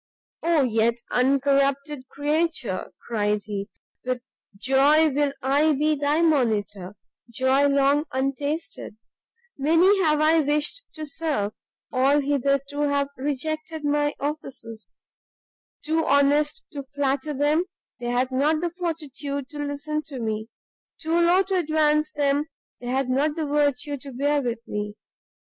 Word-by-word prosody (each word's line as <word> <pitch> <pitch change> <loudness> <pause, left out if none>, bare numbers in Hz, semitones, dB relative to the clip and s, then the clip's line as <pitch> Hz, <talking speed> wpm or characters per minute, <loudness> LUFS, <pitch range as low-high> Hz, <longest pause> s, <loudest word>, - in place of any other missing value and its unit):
"Oh 330 -3 +3
yet 230 -1 +2 0.2
uncorrupted 275 +1 +1
creature!" 295 - -1
cried 210 -2 0
he, 200 0 -5 0.3
"with 255 0 -1 0.4
joy 280 +7 +4
will 290 0 +1
I 290 +4 +3
be 305 +2 +2
thy 290 +3 +1
monitor, 210 - 0 0.3
joy 260 +4 +2
long 280 +2 +3
untasted! 280 0 -3 0.6
Many 335 +8 +4
have 305 -3 +3
I 315 +2 +4
wished 300 - 0
to 310 -1 -6
serve, 280 -9 -2 0.4
all, 270 +3 +3
hitherto, 280 0 0
have 285 -1 +1
rejected 310 +3 -3
my 290 0 +1
offices; 260 -7 -6 0.9
too 320 +1 +1
honest 290 +7 +2
to 285 - -5
flatter 280 +1 -2
them, 295 +5 +2 0.3
they 240 - -5
had 250 +2 0
not 295 +4 +2
the 345 -1 -1
fortitude 295 -5 -4
to 295 - -9
listen 290 +1 -2
to 275 -4 -7
me; 220 -1 -3 0.5
too 320 +1 -3
low 345 +3 +4
to 380 0 -1
advance 305 -2 +2
them, 285 0 +1 0.3
they 245 - -8
had 265 +1 0
not 285 +4 +1
the 320 -2 -2
virtue 290 -1 0
to 275 +1 -9
bear 285 +3 +1
with 235 -2 -4
me. 210 0 -4
285 Hz, 130 wpm, -24 LUFS, 260-305 Hz, 0.9 s, joy